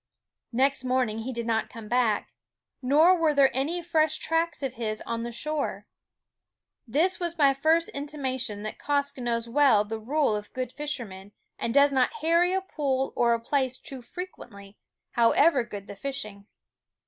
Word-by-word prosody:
Next 265 +2 +1
morning 250 -4 0
he 240 +4 -4
did 235 -2 -4
not 225 -1 0
come 225 -2 -10
back; 240 -3 +1 0.5
nor 305 +8 +5
were 320 -4 +1
there 275 -2 +4
any 320 +7 -1
fresh 315 -2 +2
tracks 325 -2 -1
of 265 -2 -2
his 220 -3 -3
on 230 0 -4
the 235 +1 -4
shore. 300 +5 -3 1.0
This 320 +11 +1
was 340 -1 -3
my 280 -3 +5
first 320 +5 +2
intimation 260 -7 -3
that 215 - -6
Quoskh 285 -1 -1
knows 235 -1 -1
well 235 -5 +4
the 220 +1 -5
rule 275 0 +1
of 210 0 -6
good 255 -1 -3
fisher 295 -4 -4
men, 190 0 -12 0.3
and 230 - -1
does 280 +2 +5
not 260 - +2
harry 335 +3 +3
a 380 0 +1
pool 275 -7 -2
or 235 -1 +3
a - - -4
place 260 +1 -1
too 265 -1 -10
frequently, 230 - -10 0.4
however 250 +4 +4
good 205 -3 -8
the 200 - -9
fishing. 215 -4 -6
260 Hz, 170 wpm, -27 LUFS, 230-295 Hz, 1.0 s, nor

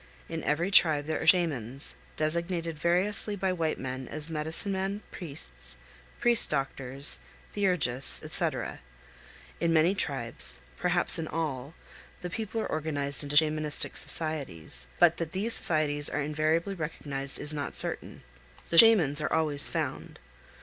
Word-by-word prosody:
In 165 -1 -5
every 165 +6 -1
tribe 155 -6 +4
there 155 +1 -3
are - - -4
Shamans, 140 - +1 0.2
designated 165 0 -2
variously 195 +5 +1
by 190 -1 -1
white 165 -3 -2
men 130 -1 -6
as 155 +1 -4
"medicine 160 +5 +1
men," 195 +2 -3
"priests," 65 - -6 0.4
"priest 240 -1 +4
doctors," 135 -1 -1 0.3
"theurgists," 180 -11 +2
etc. - - -1 0.8
In 170 -1 0
many 165 +3 +3
tribes, 120 - +2 0.2
perhaps 175 -1 +2
in 160 - -4
all, 150 -2 -4 0.5
the 180 - -5
people 225 +2 -4
are - - -3
organized 145 -3 -2
into 145 0 -4
Shamanistic 155 -1 +1
societies; 125 - -3
but 170 -1 +4
that 165 -2 -5
these 210 +5 +2
societies 145 -5 +3
are - - -3
invariably 155 +5 -1
recognized 145 -5 -4
is 150 - 0
not 145 -2 -5
certain. - - -5 0.5
The 165 - +6
Shamans 165 -11 +6
are 155 - -2
always 150 -3 +5
found. - - -5
155 Hz, 135 wpm, -28 LUFS, 145-175 Hz, 0.8 s, The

